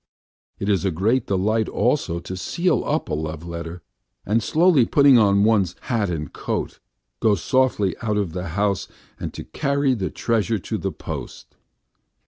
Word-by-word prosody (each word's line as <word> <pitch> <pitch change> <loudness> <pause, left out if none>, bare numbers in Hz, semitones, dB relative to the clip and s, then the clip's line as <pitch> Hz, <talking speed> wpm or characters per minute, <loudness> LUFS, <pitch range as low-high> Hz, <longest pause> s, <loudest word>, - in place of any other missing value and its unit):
It 100 - -4
is 100 -2 +2
a 95 - +2
great 110 +9 +1
delight 105 +3 +1
also 85 - 0
to 95 - -6
seal 170 - 0
up 155 +2 -1
a - - -4
love 80 +1 -4
letter, 85 0 -6 0.4
and, 110 +4 +2
slowly 160 - +4
putting 140 +1 +5
on 100 -2 +4
one's 100 -5 +2
hat 110 -6 -1
and 75 -4 -4
coat, - - -3
to - - -25 0.4
go 110 -2 +3
softly 105 -1 +1
out 105 -2 0
of 100 -6 -1
the 90 0 -4
house 100 -2 0 0.3
and - - -4
to - - -6
carry 140 -2 0
the 95 -6 -2
treasure 115 -1 0
to 90 - -4
the - - -2
post. - - -8
105 Hz, 170 wpm, -22 LUFS, 90-120 Hz, 0.4 s, putting